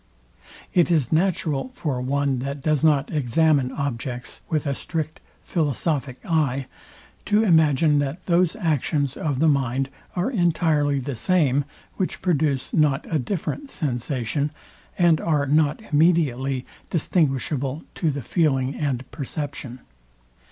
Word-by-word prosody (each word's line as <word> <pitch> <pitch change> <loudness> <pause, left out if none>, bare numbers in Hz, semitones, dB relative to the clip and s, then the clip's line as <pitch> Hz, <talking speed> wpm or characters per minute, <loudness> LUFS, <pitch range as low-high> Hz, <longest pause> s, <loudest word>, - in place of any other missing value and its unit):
It 175 -1 +4
is 155 -8 +2
natural 160 - +1
for 135 -6 -2
one, 140 0 0
that 140 +2 -5
does 155 -1 +1
not 150 -2 +3
examine 145 -1 +2
objects 130 -3 -4
with 155 -3 0
a 140 - 0
strict 155 +2 -4 0.2
philosophic 145 -4 -1
eye, 140 -6 +1 0.6
to 210 +1 +3
imagine, 155 -5 +4
that 145 +6 -3
those 175 +1 +2
actions 150 - 0
of 145 -4 -2
the 160 +4 +3
mind 135 -2 +1 0.2
are 185 +8 0
entirely 160 - +2
the 135 +1 -3
same, 145 -1 +2 0.3
which 185 - -2
produce 150 -6 0
not 150 -2 +2
a 155 - +3
different 200 - -3
sensation, 140 - -2 0.5
and 170 -3 +4
are 150 -3 +1
not 150 +1 +2
immediately 140 -5 +2 0.2
distinguishable 145 -3 0
to 165 - 0
the 140 -2 -3
feeling 135 -5 +1
and 135 -4 -2
perception. 140 -3 -5
145 Hz, 125 wpm, -23 LUFS, 135-160 Hz, 0.6 s, It